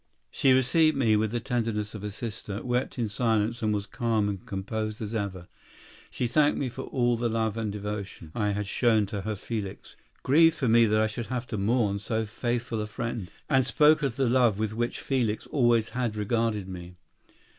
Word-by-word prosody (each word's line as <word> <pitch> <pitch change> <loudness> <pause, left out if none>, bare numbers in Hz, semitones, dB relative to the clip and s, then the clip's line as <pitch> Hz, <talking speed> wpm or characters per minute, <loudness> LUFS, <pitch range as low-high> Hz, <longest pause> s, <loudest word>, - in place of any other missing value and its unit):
"She 135 - +3
received 145 +4 +4
me 115 -5 +3
with 110 +1 +1
the 120 +2 -2
tenderness 115 -3 -2
of 105 -2 -7
a 105 - -3
sister, 105 -1 -5
wept 125 +2 -1
in 120 -2 0
silence, 110 +2 0
and 110 -1 +1
was 105 -1 -1
calm 110 -2 0
and 100 -2 -4
composed 110 +2 -4
as 110 0 -5
ever. 95 -5 -3 0.6
She 125 - -2
thanked 145 +5 +3
me 135 - -1
for 130 +2 -7
all 120 -2 +1
the 120 0 -1
love 110 -1 0
and 110 -2 -2
devotion 100 -5 -6
I 105 -2 0
had 105 0 -1
shown 110 +1 +2
to 100 0 -4
her 110 +2 -3
Felix, 100 -1 -6 0.3
grieved 165 +4 +5
for 135 - 0
me 115 +1 +6
that 110 +1 +3
I - - +3
should 110 +2 -4
have 125 -1 -3
to 110 - -3
mourn 105 -1 +1
so 110 +2 -1
faithful 120 +1 -2
a 105 - -3
friend, 110 -3 -4 0.2
and 135 -3 +3
spoke 150 +4 +4
of 135 -5 -1
the 135 -1 +1
love 120 -4 +3
with 110 0 -1
which 120 +2 -2
Felix 120 -6 -1
always 120 -5 +2
had 120 -3 -2
regarded 105 -1 0
me. 90 -1 -8
110 Hz, 200 wpm, -27 LUFS, 105-120 Hz, 0.6 s, me